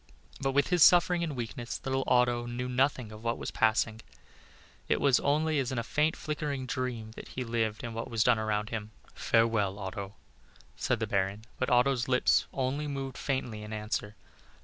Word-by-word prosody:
But 135 0 0
with 140 +1 +2
his 180 -2 +2
suffering 175 0 +6
and 155 -4 -3
weakness, 120 0 -5
little 135 0 0
Otto 120 -1 +3
knew 120 +1 -3
nothing 125 -2 0
of 110 +1 -11
what 115 0 0
was - - -5
passing; 110 0 +1 0.9
it - - +2
was 140 -3 +4
only 155 +1 +1
as 130 -1 -1
in 130 - -3
a 115 - 0
faint 150 +6 +1
flickering 150 -4 -3
dream 125 -4 -3
that - - -10
he 130 - -4
lived 115 -2 -1
in 120 -1 -5
what 115 +3 -5
was 115 -2 +2
done 110 - +4
around 105 0 -1
him. 110 -2 -4 0.2
"Farewell, 115 -4 +2
Otto," 100 0 -6 0.6
said 120 - 0
the 110 - 0
Baron, 100 +1 -1
but 130 - 0
Otto's 125 0 +3
lips 125 -1 +3
only 140 +3 -2
moved 135 -2 -4
faintly 130 -6 -3
in 105 0 -8
answer. 105 -1 -3
120 Hz, 185 wpm, -30 LUFS, 110-135 Hz, 0.9 s, suffering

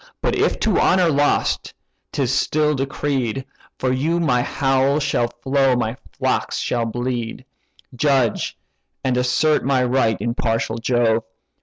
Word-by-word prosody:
But - - 0
if - - +1
to 215 -5 +2
honour 180 -2 +4
lost, 145 0 +1 0.4
'tis 135 -3 0
still 150 +3 +1
decreed 135 -2 -2 0.3
For 130 - 0
you 160 +7 0
my 125 -7 +2 0.2
bowl 135 +1 +3
shall 140 -5 +1
flow, 130 +2 +1
my 115 -1 -1 0.2
flocks - - 0
shall 120 -1 -1
bleed; 120 0 -3 0.5
Judge, 130 -4 +1 0.5
and 130 -1 +1
assert 125 +5 +2
my 130 -1 +2
right, 125 -3 +2
impartial 115 0 -1
Jove! 115 -1 +1
130 Hz, 130 wpm, -21 LUFS, 120-140 Hz, 0.5 s, honour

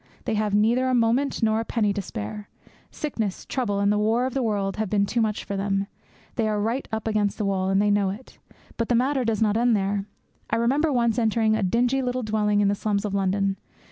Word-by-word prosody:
They 230 - -1
have 210 -1 0
neither 235 +5 +3
a 255 - +2
moment 240 +3 +1
nor 220 0 +3
a - - -1
penny 215 -3 0
to 200 - -2
spare. 195 - -6 0.4
Sickness, 225 -10 -4
trouble, 215 -7 -1
and 200 0 +2
the 210 - +1
war 225 +4 +2
of 260 - -3
the 270 - 0
world 200 -4 -1
have 215 -2 -1
been 200 0 +2
too 235 +3 0
much 215 -2 -1
for 200 - -4
them. 195 0 0 0.5
They 225 -2 +1
are 210 -1 0
right 230 +6 -1
up 220 0 -3
against 210 -2 0
the 210 - -1
wall; 190 -1 0
and 195 0 +2
they 205 0 +3
know 205 -1 +2
it. 210 +7 -9 0.4
But 230 - -2
the 245 - +3
matter 260 +2 +1
does 225 -1 +1
not 210 0 +2
end 235 -1 +3
there. 195 0 -1 0.4
I - - +1
remember 275 +7 +2
once 235 -2 +1
entering 220 -1 +2
a 220 - -1
dingy 245 +7 +1
little 250 0 -2
dwelling 210 -1 +1
in 205 - +3
the 200 - +2
slums 205 0 -1
of 205 - -3
London. 195 0 0
215 Hz, 235 wpm, -24 LUFS, 200-235 Hz, 0.5 s, neither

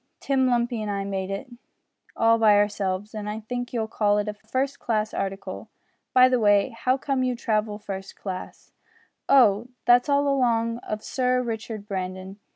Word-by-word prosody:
Tim 265 -2 +1
Lumpy 240 -2 0
and 210 - -3
I 200 -1 -2
made 195 -1 -3
it 195 +7 -4 0.7
all 230 0 +4
by 215 -2 +6
ourselves, 205 0 0
and 210 -1 -5
I 215 +1 -4
think 245 +2 -5
you'll 225 -3 -2
call 205 -2 +1
it 210 0 -1
a 210 - -2
first 260 +6 -3
class 215 -2 -1
article. 195 0 -5 0.4
By 255 0 +7
the 255 -1 +2
way, 205 +1 +4
how 255 +2 0
came 275 -1 -1
you 255 -1 0
to 235 - -15
travel 215 -1 0
first 195 -2 -7
class?" 185 -2 -7 0.6
"Oh! 235 -5 +5 0.2
that's 245 +3 +5
all 285 0 +3
along 235 -4 +1
of 215 -2 -5
Sir 250 -1 0
Richard 220 -2 -5
Brandon. 185 0 -5
220 Hz, 175 wpm, -25 LUFS, 205-245 Hz, 0.7 s, By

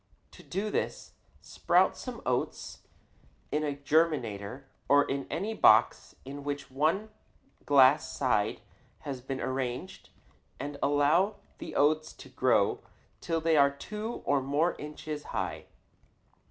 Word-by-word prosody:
To - - -14
do 210 +2 -3
this, - - -3 0.3
sprout - - +2
some - - -8
oats - - -2 0.7
in 150 +1 0
a 145 -2 -2
germinator 140 -6 0 0.3
or 145 0 +6
in 140 0 -3
any 195 +8 -2
box 110 - +4
in 140 +1 -8
which 145 -1 -5
one 165 +11 0 0.6
glass 140 +1 +5
side - - 0 0.4
has 135 -3 -6
been 135 +1 -5
arranged 130 +7 -4 0.5
and 145 0 -6
allow 155 +8 +3 0.2
the - - -7
oats 155 +2 +2
to 135 - -13
grow 125 -5 +2 0.4
till 165 -1 -1
they 160 -1 +3
are 140 -1 +6
two 210 +11 -6
or 140 0 +2
more 145 +6 +1
inches 150 0 -7
high. - - -4
145 Hz, 125 wpm, -29 LUFS, 135-160 Hz, 0.7 s, or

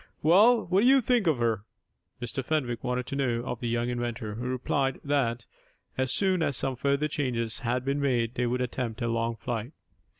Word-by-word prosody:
"Well, 215 +9 +6
what 185 +3 +2
do 240 - +4
you 270 +1 +7
think 240 -5 +1
of 155 -5 +3
her?" 115 -4 0 0.6
Mr. 120 +2 -4
Fenwick 125 -5 -1
wanted 125 0 -1
to 140 - -5
know 120 -4 0
of 125 - -4
the 120 - -3
young 120 +1 0
inventor, 120 -3 -3
who 120 +4 -4
replied 135 +1 -1
that, 125 -5 0 0.5
as 130 0 0
soon 185 +2 +1
as 140 -5 +1
some 135 -1 0
further 140 +4 +1
changes 125 -7 -1
had 125 +1 -1
been 140 +1 0
made, 120 -4 +1
they 125 -1 0
would 125 +1 -1
attempt 125 -2 -3
a - - 0
long 115 0 -1
flight. 115 +4 -4
125 Hz, 200 wpm, -28 LUFS, 120-140 Hz, 0.6 s, you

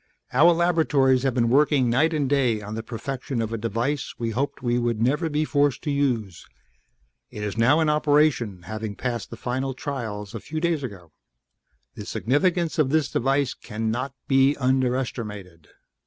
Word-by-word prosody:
"Our 155 +7 +6
laboratories 160 -7 +3
have 135 -2 0
been 120 -2 +2
working 140 0 +3
night 130 +8 +3
and 150 -4 0
day 130 -5 +2
on 105 0 -7
the 115 - -3
perfection 125 +2 -5
of 115 0 -2
a - - -1
device 115 +6 -2
we 115 -1 -2
hoped 135 +3 -3
we 120 0 +1
would 120 -2 -1
never 145 +8 +1
be 150 +1 0
forced 145 -4 +1
to 150 - -1
use. 120 - -1 0.8
It 105 - -7
is 105 -1 -3
now 120 +7 +4
in 160 - +2
operation, 145 - +2
having 110 +2 -5
passed 120 -2 -3
the 115 - -8
final 130 +2 -3
trials 110 -8 -5
a 115 - -5
few 155 +8 -5
days 165 -2 0
ago. 95 - -8 0.8
"The - - -9
significance 165 +4 0
of 145 -4 +3
this 150 -3 +1
device 135 +1 +1
cannot 115 +5 -4
be 135 +1 +4
underestimated. 125 - -2
130 Hz, 170 wpm, -24 LUFS, 115-145 Hz, 0.8 s, Our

